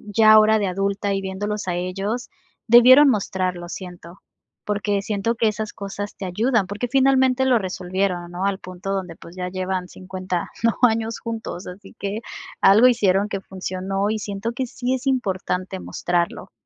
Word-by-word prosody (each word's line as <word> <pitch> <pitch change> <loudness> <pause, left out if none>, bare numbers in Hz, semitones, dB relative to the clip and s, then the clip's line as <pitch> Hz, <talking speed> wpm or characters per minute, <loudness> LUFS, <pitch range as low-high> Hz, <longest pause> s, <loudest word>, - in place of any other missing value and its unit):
ya 215 -1 +7
ahora 215 0 +6
de 200 - 0
adulta 195 +2 -1
y 195 - -2
viéndolos 200 +1 -4
a 175 - 0
ellos, 195 +7 -3 0.4
debieron 255 +5 +8
mostrarlo, 185 -5 -1
siento, 180 -1 -9 0.5
porque 205 -1 -1
siento 205 +2 -1
que 225 - +2
esas 215 0 -5
cosas 200 +1 -6
te 195 - -6
ayudan, 215 +2 +1
porque 210 +5 -3
finalmente 265 0 +3
lo 250 -2 +5
resolvieron, 185 -2 -2
¿no? 180 +2 -3
Al 200 -1 0
punto 185 +2 -6
donde, 185 -4 -4
pues 170 +2 -14
ya 180 -1 -4
llevan 185 0 -3
50 185 -1 -5
¿no?, 230 -3 +3
años 225 0 -2
juntos, 225 -6 -6
así 195 +2 -11
que 200 +2 -3 0.4
algo 205 +5 +7
hicieron 205 -4 +2
que 195 - -3
funcionó 190 +1 -3
y 220 - -2
siento 205 +2 -4
que 255 +1 -3
sí 250 +2 -2
es 260 +1 -6
importante 190 -6 -1
mostrarlo. 175 -1 -2
200 Hz, 165 wpm, -22 LUFS, 185-220 Hz, 0.5 s, debieron